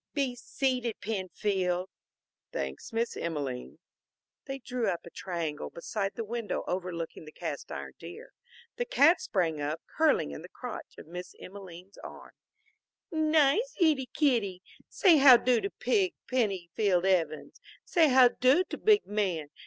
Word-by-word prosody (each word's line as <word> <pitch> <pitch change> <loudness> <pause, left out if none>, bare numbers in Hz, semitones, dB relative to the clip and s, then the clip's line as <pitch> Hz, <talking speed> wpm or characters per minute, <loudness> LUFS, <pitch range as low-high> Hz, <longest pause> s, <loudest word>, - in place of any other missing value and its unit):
"Be 270 -4 0
seated, 250 -2 -2
Penfield." 190 -3 -1 0.6
"Thanks, 65 0 -5
Miss 230 +1 -1
Emelene." 140 -7 -4 0.7
They 270 0 -5
drew 250 -2 -3
up 170 - -2
in - - -9
a - - -44
triangle 170 -5 -4
beside 195 +3 -4
the 230 - -3
window 230 0 -3
overlooking 175 -3 -4
the 155 - -11
cast - - -6
iron - - -6
deer. - - -10 0.4
The 485 - -1
cat 335 -6 +4
sprang 165 -6 -1
up, 150 +3 -2
curling 310 - +1
in 70 - -7
the - - -11
crotch - - -8
of - - -10
Miss 180 +3 -8
Emelene's 185 -1 -11
arm. - - -11 0.8
"Nice 315 - +2
ittie 300 -7 +2
kittie, 220 -11 +1 0.3
say 355 -6 +5
how 270 -3 +9
do 245 -1 +2
to 395 - -2
big 380 -5 +1
Penny 200 -9 -1
field 190 -4 +2
Evans. 165 -6 0 0.2
Say 325 -3 +4
how 255 -1 +7
do 260 +9 +3
to - - -7
big 425 -1 +4
man. 185 -8 -2
210 Hz, 150 wpm, -29 LUFS, 175-270 Hz, 0.8 s, how